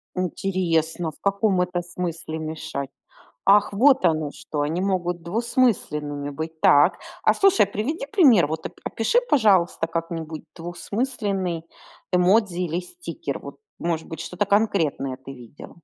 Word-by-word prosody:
Интересно, 175 -3 -1
в - - -21
каком 200 -1 +2
это 180 0 -1
смысле 170 -2 -5
мешать? 155 -3 -5 0.6
Ах, 205 +1 +5
вот 260 +1 +4
оно 155 -3 +2
что! 150 -2 -4
Они 160 +4 -1
могут 180 -3 -1
двусмысленными 170 - 0
быть. 160 +2 -6
Так. 145 0 +5 0.2
А, - - +5
слушай, 390 - +4
приведи 220 - -3
пример. 255 - +5
Вот, 160 0 -4
оп - - -8
опиши, 230 - +1
пожалуйста, 195 - +3
как-нибудь 165 -1 -4
двухсмысленный 190 0 -3 0.5
эмодзи 180 +1 +3
или 175 0 -1
стикер. 345 - -6
Вот, - - -10 0.2
может 165 -2 -2
быть, 160 0 -7
что-то 180 +4 -2
конкретное 170 -11 +1
ты 135 +1 -10
видел. 125 +2 -12
175 Hz, 135 wpm, -24 LUFS, 160-200 Hz, 0.6 s, Ах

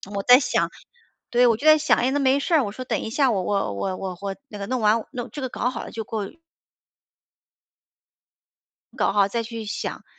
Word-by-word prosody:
我 200 - -2
在 250 +3 +8
想 275 - 0 0.6
对， 245 0 +4
我 230 - +4
就 285 - -7
在 310 0 +8
想： 310 - +2
“哎， 255 +2 +1
那 285 - 0
没 270 0 +3
事 335 - -2
儿， 300 - +4
我 200 - -4
说 255 - -6
等 - - -1
一 - - -5
下， 265 +2 +2
我 195 -4 -1
我 195 - -1
我 185 - -3
我 185 -2 -5
我 195 -1 -4
那 210 - -9
个 200 - -5
弄 255 -1 -2
完， 215 +1 +2
弄 245 -1 -6
这 290 - -7
个 260 - -2
搞 245 - -1
好 255 - -6
了 - - -8
就 225 - -5
过“ 210 -1 -4 2.7
搞 - - +1
好 200 -1 +3
再 230 +3 -2
去 230 -1 -7
想， 210 - -5
230 Hz, 235 characters per minute, -23 LUFS, 200-260 Hz, 2.7 s, 在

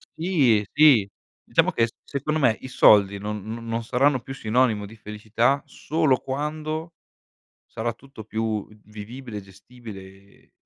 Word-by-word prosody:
Sì. 140 - +2
Sì. 140 -9 +6 0.4
Diciamo - - +2
che 115 0 +2
s - - -13
secondo 150 +3 -2
me 120 -5 +3
i - - -7
soldi 100 -5 +5
non 105 0 -5
no 110 +2 -6
non 115 0 -3
saranno 130 +2 +2
più 135 - -8
sinonimo 110 -3 +1
di 105 +2 -12
felicità 110 +5 -1
solo 155 -4 0
quando 155 +4 -4 0.7
sarà 115 +1 -4
tutto 135 -2 -13
più 110 -1 -3 0.2
vivibile 110 +2 -9
e - - -6
gestibile, 100 +2 -12
e 95 +1 -18
115 Hz, 145 wpm, -24 LUFS, 105-135 Hz, 0.7 s, Sì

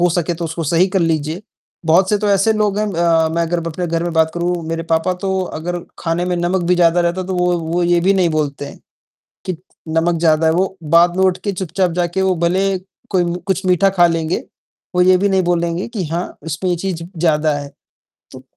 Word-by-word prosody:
हो 175 - +4
सके 175 0 -1
तो 170 0 -5
उसको 160 0 -4
सही 170 +5 +3
कर 190 0 0
लीजिए। 160 +2 -1 0.4
बहुत 180 +4 +4
से 210 - +3
तो 205 0 -1
ऐसे 200 +3 +3
लोग 210 -1 0
हैं 215 - 0
अ, 165 -1 +2
मैं 170 - +1
अगर 170 +1 -1
अपने 170 +2 -3
घर 165 0 -1
में 175 - -2
बात 160 0 +2
करूँ 175 +1 0
मेरे 165 0 -2
पापा 160 +3 +2
तो 190 -1 0 0.2
अगर 175 +2 -3 0.2
ख़ाने 170 +1 -1
में 180 0 -1
नमक 175 +2 0
भी - - +6
ज़्यादा 175 0 +3
रहता 175 +2 0
तो 190 0 -3
वो 180 0 +2
वो 165 +2 -1
ये 175 0 +3
भी 190 +3 +3
नहीं 185 -3 +3
बोलते 145 -2 -2
हैं, - - -11 0.7
कि 185 -3 -2 0.3
नमक 165 +1 +1
ज़्यादा 160 -1 +3
है, 160 - +4
वो 190 +2 0
बाद 170 +3 +4
में 190 - +3
उठके 190 +2 0
चुपचाप 185 0 -1
जाके 175 +2 -1
वो 190 -1 +2
भले 190 +2 +1 0.3
कोई 180 -2 +2 0.2
कुछ 190 0 -1
मीठा 185 +2 +4
ख़ा 175 - +7
लेंगे। 165 0 -1 0.5
वो 180 - +4
ये 185 0 +5
भी 200 +2 +1
नहीं 190 -1 +2
बोलेंगे 170 +2 -1
कि 215 -6 -4
हाँ, 170 +3 -4
इसमें 165 +4 -2
ये 175 - +1
चीज़ 175 -1 -4 0.2
ज़्यादा 155 -2 +2
है। 145 0 -7 0.6
तो - - -11
175 Hz, 225 wpm, -18 LUFS, 165-185 Hz, 0.7 s, ख़ा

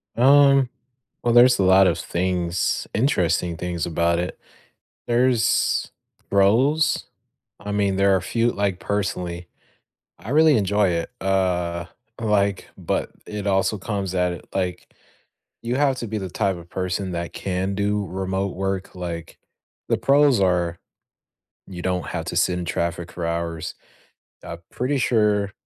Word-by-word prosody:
Um, 135 +1 +5 0.5
well, 120 -1 +2
there's 120 -1 +6
a - - +3
lot 95 +1 +6
of - - +1
things, 90 0 -1
interesting 90 - +1
things 85 -1 -3
about 85 0 +1
it. 90 - -4 0.7
There's 120 -1 +2 0.4
pros, 130 +11 +3 0.5
I 105 0 -5
mean, 100 -2 +1
there 100 0 +4
are - - 0
few 115 +5 +1
like, 100 -2 -1
personally, 90 -4 -3 0.7
I 110 - -9
really 155 0 +5
enjoy 100 0 +2
it, 85 -1 -2
uh, 90 -3 0 0.3
like, 100 -3 0
but - - -2 0.2
it 105 -1 -5
also 100 +2 +1
comes 95 -1 -3
at, 90 -1 -1
like 90 -2 -3 0.7
you 120 +2 -1
have 140 -2 +2
to 115 - -4
be 110 +1 -3
the 95 -2 -5
type 95 -1 0
of 85 0 -12
person 95 0 -3
that 85 0 -4
can 95 +1 -2
do 100 +1 0
remote 95 +2 -3
work, 95 0 -3
like 85 -2 -6 0.5
the - - +2
pros 140 -4 +4
are 90 -2 +1 0.9
you 90 -2 -8
don't 90 -4 -1
have - - -4
to - - -4
sit 90 - +2
in 90 - -4
traffic 85 +1 -3
for 85 -1 -4
hours. 85 -1 -3 0.7
I'm 85 - -7
pretty 135 +3 -1
sure 105 -4 +2
95 Hz, 145 wpm, -23 LUFS, 90-110 Hz, 0.9 s, there's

